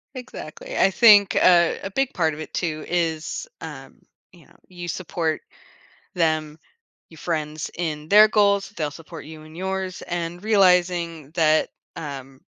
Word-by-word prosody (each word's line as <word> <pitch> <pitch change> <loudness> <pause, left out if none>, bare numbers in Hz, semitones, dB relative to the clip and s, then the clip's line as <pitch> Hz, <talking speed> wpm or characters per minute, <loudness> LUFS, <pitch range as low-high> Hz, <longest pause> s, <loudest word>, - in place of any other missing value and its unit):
Exactly. 470 - -8
I 195 - +4
think 205 -2 +6
a 170 -2 +4
a 195 - -4
big 270 +5 -1
part 160 -4 +1
of 150 - -9
it 155 - -8
too 155 -3 -3
is, 165 - -2
um, - - -10 0.3
you - - -19
know, - - -24
you 175 -1 -8
support 165 -2 -2 0.7
them, 155 -2 0 0.5
your 160 - -16
friends, 155 -2 -3
in 155 -3 -4
their 210 +3 +8
goals, 200 -2 +2
they'll 155 -3 -2
support 155 +1 -11
you 155 0 -11
in 155 0 -14
yours 190 0 -4
and 175 +1 -4
realizing 180 -7 +2
that, 155 -2 +2 0.3
um 135 -3 -8
170 Hz, 150 wpm, -23 LUFS, 155-190 Hz, 0.7 s, their